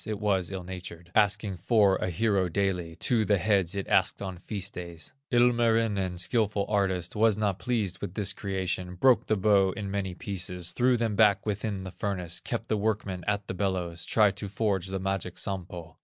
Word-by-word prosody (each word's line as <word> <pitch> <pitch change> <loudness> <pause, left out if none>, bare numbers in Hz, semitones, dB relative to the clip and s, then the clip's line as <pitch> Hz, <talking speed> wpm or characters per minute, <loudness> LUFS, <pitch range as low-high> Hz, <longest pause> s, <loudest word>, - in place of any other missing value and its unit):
it 105 -2 -3
was 95 -4 +1
ill 95 -2 -5
natured, 90 -2 -8
Asking 105 -1 +2
for 100 0 +3
a 90 - -2
hero 95 0 +1
daily, 90 -3 -1
Two 110 +6 +1
the 100 -1 +2
heads 95 -1 +1
it 100 - -3
asked - - +2
on 95 -3 -6
feast 100 0 -5
days. 85 +3 -8 0.2
Ilmarinen, 115 -6 +2
skilful 105 +1 +1
artist, 95 -4 0
Was 110 -1 +3
not 100 -3 0
pleased 110 -7 -1
with 95 -3 -5
this 100 -3 -1
creation, 95 -3 -3
Broke 125 +5 +4
the 110 - +2
bow 95 -1 +3
in 100 -2 -5
many 95 -2 -2
pieces, 90 -3 -3
Threw 125 0 +3
them 115 -3 -1
back 105 -2 +4
within 105 -2 -2
the 95 - -7
furnace, 90 -5 -2
Kept - - -4
the 110 - 0
workmen 100 -4 -2
at 105 -1 0
the - - -4
bellows, 90 -3 -2
Tried 105 -3 +3
to 100 - -5
forge 95 -2 -1
the 95 0 -2
magic 95 -1 -3
Sampo. 90 -4 -5
100 Hz, 185 wpm, -28 LUFS, 90-105 Hz, 0.2 s, Broke